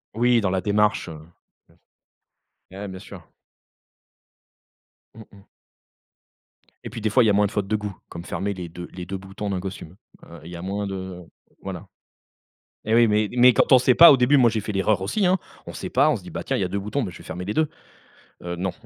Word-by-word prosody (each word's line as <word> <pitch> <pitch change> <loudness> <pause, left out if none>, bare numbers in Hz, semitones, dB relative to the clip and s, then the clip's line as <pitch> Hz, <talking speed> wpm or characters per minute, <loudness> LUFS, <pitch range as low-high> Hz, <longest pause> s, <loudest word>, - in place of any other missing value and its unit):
Oui, 120 +1 +3
dans 100 - 0
la 95 0 -1
démarche 105 +1 +1
eh, - - -7
bien 80 - -9
sûr. 80 +2 -17 1.4
Eh, 100 +2 -7
bien 95 -1 -8
sûr. 95 -4 -13 1.9
Mmh 110 -1 -12
mh. 100 -1 -17 1.4
Et - - -6
puis 115 - -8
des 110 - 0
fois, 125 +4 +4
il - - +3
y - - +4
a - - +3
moins 105 +1 +3
de 100 - -3
fautes 105 -2 -2
de 110 - 0
goût, 105 -2 -5
comme 85 - -8
fermer 100 +3 -3
les 90 -3 -7
deux 85 +1 -9
les 90 -1 -7
deux 95 +2 -5
boutons 95 +2 -7
d'un 95 -2 -2
costume. 90 -3 -8 0.3
Heu, 85 - -12
il 85 - -10
y - - -7
a 85 - -7
moins 100 +2 -3
de 95 -2 -6 0.4
voilà 95 0 -7 1.0
et 110 - 0
oui, 120 0 +5
mais 105 0 +2
mais 125 +1 +7
quand - - +2
on 130 - +8
sait 125 0 +3
pas, 170 - +10
au 135 - +5
début 125 +4 +4
moi 125 -3 +5
j'ai 110 - -1
fait 105 - -5
l'erreur 95 0 +1
aussi, 190 - 0
hein. 185 +1 +3 0.3
On - - -8
sait - - -6
pas, - - +3
on - - +2
se - - -7
dit: - - -11
«Bah - - -6
tiens - - -2
il - - 0
y 90 - -2
2 100 - -3
boutons, 105 +8 -3
bah, 100 - -4
je - - -12
vais - - -14
fermer 90 - -6
les 100 +3 -4
2». 160 -1 +2 0.8
Heu, 85 0 -4
non, 95 +1 -2
100 Hz, 240 wpm, -23 LUFS, 95-110 Hz, 1.9 s, pas